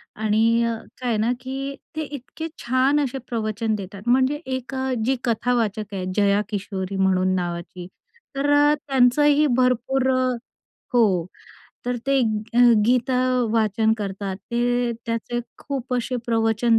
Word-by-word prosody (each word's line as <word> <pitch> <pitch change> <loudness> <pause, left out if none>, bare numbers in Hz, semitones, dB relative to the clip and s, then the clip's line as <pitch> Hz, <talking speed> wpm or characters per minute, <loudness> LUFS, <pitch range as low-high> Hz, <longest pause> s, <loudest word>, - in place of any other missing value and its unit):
आणि 220 +2 +2
अ, 230 0 0 0.3
काय 250 - -1
आहे 220 - +1
ना, 225 +3 +1
की 270 +1 -4 0.2
ते 315 - -2
इतके 290 +4 -6 0.2
छान 260 +4 +2
असे 270 0 -3
प्रवचन 220 -1 -1
देतात. 195 -1 -7
म्हणजे 260 +4 +3
एक 260 0 -4
अ, 265 0 -1
जी 265 +2 +2
कथावाचक 225 -3 0
आहे 185 -1 -3
जया 200 0 +3
किशोरी 195 -2 -4
म्हणून 185 -1 +2
नावाची. 175 0 -4 0.5
तर 285 +1 0
अ, 290 +1 +5
त्यांचंही 285 +3 +4
भरपूर 255 +1 +2
अ 255 0 +2 0.6
हो, 195 -8 +3 0.6
तर 245 0 0
ते 275 0 +3
अ, 220 +1 -1 0.3
गीता 250 +1 +2 0.4
वाचन 220 0 +2
करतात. 195 -1 -4
ते 240 +3 0
त्याचे 230 +1 -2 0.2
खूप 260 -2 -4
असे 250 +1 -1
प्रवचन 225 0 +2
235 Hz, 140 wpm, -23 LUFS, 210-260 Hz, 0.6 s, अ